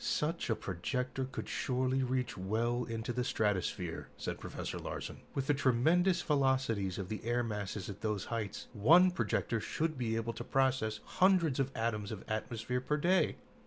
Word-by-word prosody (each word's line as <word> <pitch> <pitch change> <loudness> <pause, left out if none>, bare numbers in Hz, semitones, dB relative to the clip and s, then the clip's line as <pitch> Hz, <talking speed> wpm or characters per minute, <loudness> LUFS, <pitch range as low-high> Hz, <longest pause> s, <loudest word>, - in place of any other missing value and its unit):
"Such 170 - 0
a 110 - +3
projector 125 +7 -2
could 130 - -6
surely 130 0 0
reach 130 -1 -1
well 115 +5 0
into 115 +1 -3
the 125 +1 0
stratosphere," 105 -7 -1
said - - -4
Professor - - -5
Larsen. - - -6
"With 135 - 0
the 145 - +3
tremendous 160 +8 +3
velocities 130 - +1
of 95 - -3
the 105 0 -5
air 120 +2 +1
masses 105 -3 -3
at 100 -1 -7
those 105 -2 -1
heights, 105 -3 -3
one 170 - +6
projector 115 -8 0
should 155 +5 -2
be 115 -2 0
able 115 +1 -1
to - - -6
process 130 -5 +1
hundreds 180 -7 +3
of 135 0 +1
tons 110 -2 -1
of 110 - -6
atmosphere 115 +3 -2
per 150 +4 0
day." 180 +5 +3
120 Hz, 165 wpm, -33 LUFS, 110-135 Hz, -, one